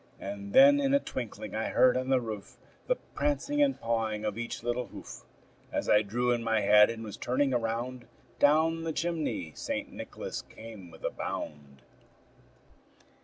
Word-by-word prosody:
And 100 0 -6
then 285 +1 +8
in 275 0 +3
a - - +5
twinkling 110 - -6
I 110 +1 -1
heard 130 - +5
on 130 +1 -1
the 130 -1 +4
roof 110 -4 -7 0.3
The - - +3
prancing 290 -6 -1
and 280 -2 +3
pawing 110 -2 -1
of 105 -2 -1
each 115 0 -5
little 120 0 -1
hoof. - - -10 0.5
As - - -2
I 105 - +6
drew 120 +4 0
in 120 -1 0
my 110 -1 +2
head, 105 +1 +7
and 115 -1 -5
was 105 -2 -7
turning 135 +2 +1
around, 120 +1 -2 0.3
Down 160 +3 +4
the 165 -1 -3
chimney 155 - -2
St. - - -4
Nicholas - - -6
came 110 -5 -11
with 80 - -15
a - - -1
bound. 70 -3 -6
115 Hz, 170 wpm, -30 LUFS, 105-145 Hz, 0.5 s, then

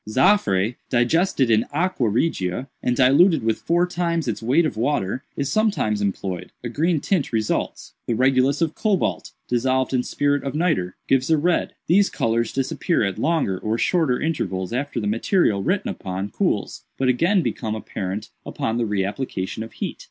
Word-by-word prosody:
Zaffre, 115 - +2
digested 130 +1 +2
in 110 0 +3
aqua 160 -6 0
regia, 105 - -1
and 125 - 0
diluted 140 - +5
with 110 -1 0
four 175 +1 +2
times 170 -3 -1
its 110 -2 -2
weight 135 +9 +3
of 155 - -2
water, 120 -1 -1
is 140 -1 -1
sometimes 200 - +1
employed; 95 -2 -3
a 120 - -3
green 160 +6 +1
tint 175 -1 0
results. 110 -2 -2
The 115 - 0
regulus 130 +3 +2
of 160 -2 -1
cobalt, 185 - -1 0.2
dissolved 130 +2 0
in 125 - +2
spirit 145 +2 0
of 135 +1 -4
nitre, 155 - 0
gives 135 +1 +2
a 160 - +4
red. 170 +4 0
These 200 +4 +4
colors 115 0 0
disappear 135 +3 0
at 100 -2 -2
longer 145 - 0
or 110 +1 -1
shorter 155 -4 +1
intervals 95 - -2
after 140 +3 -2
the 105 - -3
material 110 - +1
written - - 0
upon 95 +2 -5
cools, - - -1
but 130 - 0
again 170 +9 +3
become 110 -6 -2
apparent 105 0 -5
upon 115 +1 -2
the 115 - 0
re 100 -2 0
application 100 -2 -4
of 110 - -7
heat. - - -5
130 Hz, 170 wpm, -22 LUFS, 110-160 Hz, 0.2 s, diluted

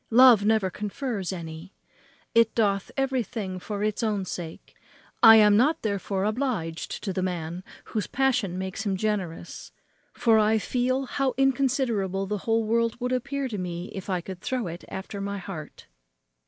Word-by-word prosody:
love 240 -3 +7
never 215 -3 +2
confers 210 0 -3
any. 165 +1 -8 0.6
It 230 -1 +4
doth 200 -3 +1
everything 230 -8 -2
for 205 +2 -4
its 215 +1 -1
own 210 -4 0
sake. 165 -3 -7 0.5
I 225 0 +10
am 210 -2 +7
not 290 +9 +3
therefore 200 -2 -1
obliged 215 -8 -2
to 195 - -2
the 185 - -1
man 175 -1 -3 0.2
whose 215 -3 -3
passion 250 -9 +1
makes 190 +3 -4
him 195 -3 -1
generous; 190 -5 -3 0.4
for 225 -2 +3
I 215 +1 +3
feel 255 +4 0
how 270 0 -1
inconsiderable 250 -8 +1
the 210 +1 -2
whole 225 0 +3
world 230 +1 0
would 250 0 -2
appear 275 +2 -1
to 210 -4 -4
me 175 0 -5
if 190 0 -7
I 180 -2 0
could 185 +1 -8
throw 255 -2 -2
it 170 0 -6
after 195 +1 -6
my 200 0 -3
heart." 180 -6 -8
210 Hz, 160 wpm, -26 LUFS, 190-240 Hz, 0.6 s, I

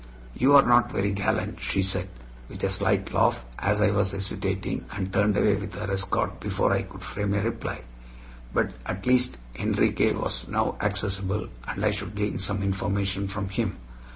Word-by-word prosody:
"You 135 - +5
are 140 - +9
not 120 0 +4
very 100 +1 0
gallant," 100 -9 -1
she 65 +10 +1
said, 95 0 -1 0.4
with - - -9
a - - +2
slight - - +1
laugh, 65 - +2
as 105 +1 +1
I 105 -1 +4
was 100 -2 +1
hesitating, 100 -1 -2
and 95 -1 -3
turned 100 +1 +3
away 105 - +4
with 100 -1 -5
her 105 -1 -3
escort 95 0 -1
before - - +1
I - - +2
could - - -9
frame 100 -1 -1
a 100 - +1
reply. 115 - -3 0.7
But - - +1 0.2
at 95 +1 -4
least 125 0 +3 0.2
Enriquez - - +2
was - - -2
now - - 0
accessible, 100 0 -1 0.2
and 100 - -2
I 105 - +4
should 105 0 -5
gain 105 0 -1
some 100 +1 -1
information 100 0 -1
from 100 0 -3
him. 95 -1 -2
100 Hz, 180 wpm, -26 LUFS, 95-105 Hz, 0.7 s, are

